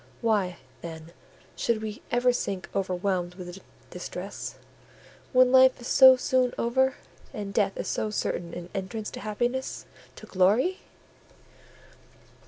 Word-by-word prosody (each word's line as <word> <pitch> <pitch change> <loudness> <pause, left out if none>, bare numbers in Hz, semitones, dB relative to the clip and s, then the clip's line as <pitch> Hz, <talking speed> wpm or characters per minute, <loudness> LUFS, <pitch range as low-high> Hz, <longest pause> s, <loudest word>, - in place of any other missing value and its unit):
Why, 205 -6 +1 0.2
then, 160 -1 -8 0.4
should 220 -2 0
we 215 -1 -6
ever 245 +1 +3
sink 195 -6 -3
overwhelmed 185 -1 -1
with 180 0 -8 0.3
distress, - - -6 0.8
when 255 -1 +5
life 260 0 +6
is 240 - -7
so 260 -1 +9
soon 255 -1 +1
over, 260 +3 +2 0.4
and 200 -2 -5
death 200 -3 +1
is - - -4
so 215 - -1
certain 175 -4 -3
an 175 0 -7
entrance 210 +2 -4
to - - -7
happiness—to 240 +5 -4
glory?" 210 - +2
215 Hz, 120 wpm, -27 LUFS, 185-250 Hz, 0.8 s, so